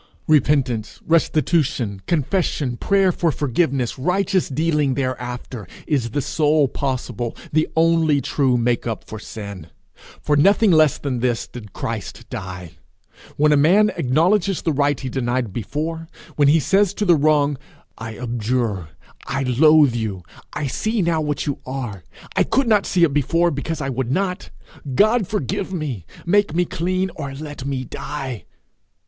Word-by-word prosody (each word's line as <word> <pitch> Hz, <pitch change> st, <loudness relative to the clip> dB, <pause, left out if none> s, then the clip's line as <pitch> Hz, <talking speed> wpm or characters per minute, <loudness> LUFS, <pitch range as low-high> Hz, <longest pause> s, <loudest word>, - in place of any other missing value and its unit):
Repentance, 135 Hz, -7 st, +1 dB
restitution, 155 Hz, -, +1 dB
confession, 155 Hz, -5 st, 0 dB
prayer 195 Hz, +7 st, +2 dB
for 170 Hz, -1 st, 0 dB
forgiveness, 135 Hz, -3 st, -1 dB
righteous 185 Hz, +5 st, +1 dB
dealing 150 Hz, -2 st, +1 dB
thereafter, 125 Hz, -4 st, -4 dB, 0.2 s
is 135 Hz, -6 st, 0 dB
the 140 Hz, +5 st, -2 dB
sole 150 Hz, -2 st, +2 dB
possible, 125 Hz, -3 st, -3 dB, 0.2 s
the 155 Hz, +1 st, +3 dB
only 160 Hz, -2 st, +3 dB
true 135 Hz, -3 st, +1 dB
make 120 Hz, 0 st, 0 dB
up 115 Hz, -2 st, -3 dB
for 110 Hz, -, -8 dB
sin. 100 Hz, -6 st, -8 dB, 0.5 s
For 150 Hz, -, +1 dB
nothing 200 Hz, +7 st, +4 dB
less 155 Hz, -4 st, +4 dB
than 130 Hz, -4 st, -3 dB
this 120 Hz, -1 st, 0 dB
did 105 Hz, -5 st, -10 dB
Christ 115 Hz, -6 st, -5 dB
die. 90 Hz, -2 st, -7 dB, 0.6 s
When 150 Hz, +1 st, +4 dB
a -, -, +5 dB
man 195 Hz, +9 st, +4 dB
acknowledges 175 Hz, +8 st, +1 dB
the 160 Hz, -, +1 dB
right 145 Hz, 0 st, +1 dB
he 135 Hz, -, -5 dB
denied 120 Hz, -4 st, -2 dB
before; 160 Hz, +9 st, -4 dB, 0.3 s
when 145 Hz, -2 st, +4 dB
he 155 Hz, +3 st, +5 dB
says 195 Hz, +6 st, +2 dB
to 210 Hz, -, -1 dB
the 175 Hz, -3 st, +5 dB
wrong, 145 Hz, -2 st, +2 dB, 0.4 s
'I 110 Hz, -1 st, -7 dB
abjure, 115 Hz, -6 st, -2 dB, 0.4 s
I 135 Hz, -, -1 dB
loathe 145 Hz, +2 st, +5 dB
you; 110 Hz, -6 st, -3 dB, 0.3 s
I 145 Hz, -, -3 dB
see 215 Hz, -, -1 dB
now 165 Hz, -2 st, +1 dB
what 150 Hz, -1 st, -2 dB
you 145 Hz, -, -2 dB
are; 120 Hz, -8 st, -5 dB, 0.3 s
I -, -, +3 dB
could 270 Hz, -2 st, +1 dB
not 210 Hz, -3 st, +3 dB
see 180 Hz, -2 st, +2 dB
it 155 Hz, -4 st, +3 dB
before 165 Hz, +5 st, +2 dB
because 145 Hz, +3 st, -4 dB
I 135 Hz, -, -2 dB
would 130 Hz, -1 st, -2 dB
not; 185 Hz, +3 st, -1 dB, 0.5 s
God 215 Hz, -, +3 dB
forgive 200 Hz, -, -2 dB
me; 140 Hz, -, -4 dB, 0.2 s
make 200 Hz, -2 st, +2 dB
me 175 Hz, +1 st, +2 dB
clean, 185 Hz, +3 st, -1 dB
or 140 Hz, -3 st, -5 dB
let 145 Hz, -2 st, -7 dB
me 135 Hz, -2 st, -2 dB
die!' 130 Hz, -2 st, -6 dB
145 Hz, 155 wpm, -21 LUFS, 125-165 Hz, 0.6 s, a